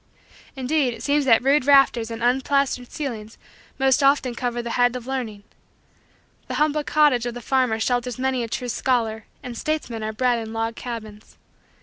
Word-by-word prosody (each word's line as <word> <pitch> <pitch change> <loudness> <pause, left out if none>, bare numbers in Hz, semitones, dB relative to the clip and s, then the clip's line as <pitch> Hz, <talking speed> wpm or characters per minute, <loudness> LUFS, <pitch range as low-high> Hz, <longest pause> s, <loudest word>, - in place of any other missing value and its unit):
Indeed 265 -1 0
it - - -11
seems 290 0 +1
that 240 -2 +5
rude 275 0 +3
rafters 270 -5 +5
and 230 0 -6
unplastered 260 0 +1
ceilings 225 -7 -6 0.4
most 270 0 +3
often 275 -2 +3
covers 240 0 -3
the 235 - -4
head 245 0 +2
of 250 -2 -6
learning. 240 -6 -4 1.0
The - - -4
humble 300 0 +1
cottage 285 -6 +3
of 240 - -5
the - - -5
farmer 250 -2 +1
shelters 245 0 -1
many 260 -1 0
a 230 - -3
true 250 +2 -4
scholar 225 -3 -1 0.2
and 245 -1 -7
statesmen 295 -5 -3
are 215 0 -3
bred 245 +2 +1
in 220 0 -7
log 225 0 -2
cabins. 220 -4 -8
245 Hz, 175 wpm, -23 LUFS, 230-270 Hz, 1.0 s, that